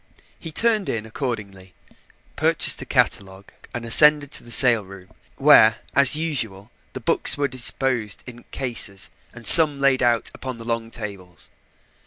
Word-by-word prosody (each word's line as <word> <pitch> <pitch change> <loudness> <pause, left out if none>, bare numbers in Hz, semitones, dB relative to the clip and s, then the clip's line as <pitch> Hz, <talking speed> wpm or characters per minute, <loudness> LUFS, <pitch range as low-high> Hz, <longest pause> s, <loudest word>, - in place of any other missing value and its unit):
He 165 - -10
turned 220 +1 -1
in 110 -2 -6
accordingly, 105 -6 -9 0.6
purchased - - 0
a - - -11
catalogue 95 0 -4 0.2
and 120 -1 -9
ascended 150 +4 +5
to - - -4
the 120 - -17
sale 120 -2 +3
room, 95 -1 -17 0.2
where, 115 -6 +2
as 140 0 +2
usual, 115 -11 -5 0.2
the - - -9
books - - +3
were 145 0 -3
disposed 125 -5 -4
in 120 -1 -15
cases 115 -7 -3 0.2
and 115 - -15
some 155 -4 +8
laid 140 -1 -1
out 120 -2 -2
upon 130 -2 -10
the 115 - -13
long 115 -1 -6
tables. 95 -5 -11
120 Hz, 150 wpm, -19 LUFS, 105-140 Hz, 0.6 s, some